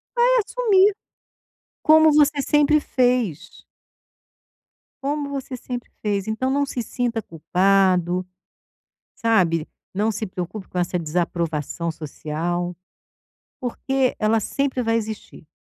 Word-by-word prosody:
Vai 480 0 +4 0.2
assumir, 420 -3 +3 0.9
como 315 0 +6
você 295 -1 +4
sempre 295 +2 +3
fez. 245 - -1 1.4
Como 290 +1 -2
você 270 -2 -5
sempre 245 0 -6
fez, 205 -2 -1
então 220 +4 -1
não 285 +1 +2
se 255 -3 -3
sinta 235 -1 -2
culpado, 180 +1 +2 0.9
sabe, 175 -8 +2 0.3
não 210 +4 +1
se 215 +1 -3
preocupe 185 +1 -6
com 180 - -4
essa 175 +1 0
desaprovação 170 -1 -2
social, 165 +3 -4 0.9
porque 260 +1 -1
ela 220 +1 +2
sempre 265 +3 -1
vai 225 -1 +1
existir. 220 -7 -6
220 Hz, 110 wpm, -22 LUFS, 180-270 Hz, 1.4 s, como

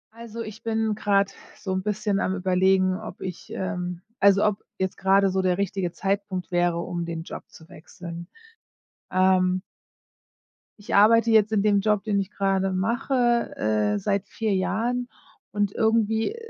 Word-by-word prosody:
Also, 230 0 -8
ich 220 0 -9
bin 225 -1 0
grade 200 -2 +1 0.3
so 190 - -5
'n 185 - -1
bisschen 210 0 -1
am 190 - 0
Überlegen, 185 0 +2
ob 180 - -9
ich 180 -2 -7
ähm, 180 -2 -4 0.2
also, 200 0 +5
ob 210 -1 0
jetzt 190 0 -2
grade 195 0 +3
so 190 0 +1
der 180 -1 +1
richtige 195 -2 -2
Zeitpunkt 195 -1 -3
wäre, 175 -1 +1
um 175 0 -3
den 165 -1 -5
Job - - -8
zu 160 - -16
wechseln, 170 0 -10 0.8
ähm. 185 0 +3 1.2
Ich 205 - -3
arbeite 230 +3 +6
jetzt 220 -1 +4
in 210 -2 +2
dem 205 -1 +3
Job, 210 -1 +1
den 205 -2 0
ich 195 +1 -4
grade 195 -1 0
mache, 240 +4 +1
äh, 105 -1 +1
seit 200 - -1
4 220 -2 -2
Jahren 235 +6 -1 0.4
und 205 -1 0
irgendwie 220 - +1
195 Hz, 155 wpm, -25 LUFS, 185-215 Hz, 1.2 s, arbeite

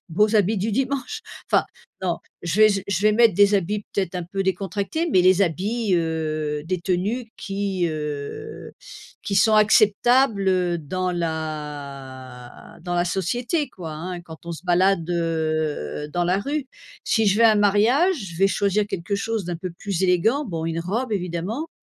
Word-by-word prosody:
beaux 210 +6 +2
habits 210 +2 +2
du 210 +4 -1
dimanche. 270 - -2 0.3
Enfin - - +4 0.4
non, 175 -2 -1 0.2
je 175 +5 -1
vais 215 - +8
je 200 -2 0
je 200 0 -1
vais 215 0 +5
mettre 230 -1 +5
des 205 +1 +5
habits 200 +2 0
peut-être 190 -3 -2
un 180 - -2
peu 195 +3 -3
décontractés, 195 - -2
mais 185 - +4
les 185 +1 +5
habits, 200 +4 0
heu, 155 -2 -1
des 180 +1 -2
tenues 200 +7 -1
qui, 195 -3 -2
heu, 150 - -6 0.5
qui 200 - -3
sont 215 +3 +5
acceptables, 215 +1 +4
heu, 180 -2 +1
dans 180 +4 -2
la 145 -6 -6
dans 175 -1 -3
la 175 0 +2
société, 245 - -1
quoi, 165 -7 -8
hein, 175 +3 -5
quand 160 -1 -13
on 170 - -5
se 165 +3 -9
balade, 180 -1 +2
heu, 155 - -1
dans 175 0 0
la 180 +2 +2
rue. 285 +2 -3 0.4
Si 225 -2 +2
je 200 +2 +3
vais 230 - +5
à 220 - +7
un - - +2
mariage, 225 - +3 0.2
je - - -9
vais 195 +2 +4
choisir 200 +1 +1
quelque 190 +1 -3
chose 220 -1 -2
d'un 175 -1 -3
peu 180 +1 -5
plus 190 +1 -4
élégant, 215 - +2
bon, 165 -6 -4
une 165 0 -2
robe, 220 +7 -2
évidemment 190 - -3
185 Hz, 175 wpm, -23 LUFS, 165-210 Hz, 0.5 s, vais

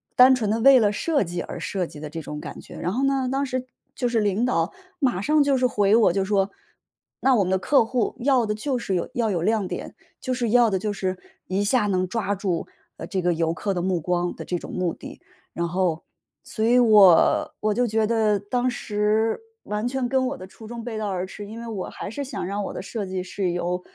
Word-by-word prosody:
单 255 +1 +8
纯 220 -5 -1
地 225 - 0
为 270 +3 +7
了 210 -3 +3
设 290 +7 +1
计 175 -1 -4
而 - - -7
设 185 -3 -2
计 150 - -11
的 150 0 -6
这 165 +2 -6
种 150 0 -6
感 - - -8
觉。 - - -12
然 180 - -2
后 250 +7 -1
呢， 270 -2 +1
当 275 +1 0
时 255 -1 -3 0.3
就 245 - 0
是 235 -1 +1
领 205 +1 +1
导 180 -8 0 0.3
马 250 - +1
上 300 +7 +3
就 280 -1 +3
是 255 - +2
回 210 -4 +3
我 225 -6 +4
就 195 0 +1
说： 195 -1 +1 0.7
“那 265 - +4
我 210 - +3
们 - - -2
的 190 - +2
客 235 +5 +3
户 240 0 -1
要 260 -2 +3
的 210 - -1
就 255 +5 -2
是 225 -5 -3
有 180 - -1
要 235 -5 0
有 175 -4 -1
亮 215 +2 +1
点， - - -6 0.2
就 255 - -2
是 245 -2 -1
要 240 0 +5
的 195 - 0
就 210 +2 -2
是 185 -2 -2 0.3
一 190 +2 0
下 210 +1 +2
能 185 -2 +1
抓 205 0 -1
住， 185 -3 -2 0.3
呃， - - -6
这 190 - -2
个 175 0 +2
游 165 0 0
客 195 +4 -2
的 180 - -2
目 185 -1 0
光 175 +1 -1
的 - - -7
这 180 - -2
种 - - -9
目 180 -2 -1
的。 - - -11 0.3
“然 170 0 -1
后 175 -2 0 0.4
所 220 - -3
以 240 +2 +4
我 210 -7 +5
我 215 0 +1
就 245 +3 +1
觉 220 0 +1
得 220 -2 +2
当 245 +5 -1
时， 215 -1 0 0.2
完 210 +2 -2
全 255 0 -1
跟 260 0 +2
我 275 +2 -4
的 185 - -9
初 220 +3 -13
衷 235 0 -7
背 230 -2 -5
道 215 -1 -2
而 185 -1 -2
驰， 205 +2 -9
因 220 +2 -8
为 - - -7
我 210 -5 -4
还 - - -7
是 255 +7 -5
想 275 -7 -5
让 200 +2 -3
我 - - -5
的 - - -5
设 205 +1 -4
计 185 -1 -3
是 185 0 -2
由 175 +1 -2
210 Hz, 265 characters per minute, -24 LUFS, 185-245 Hz, 0.7 s, 单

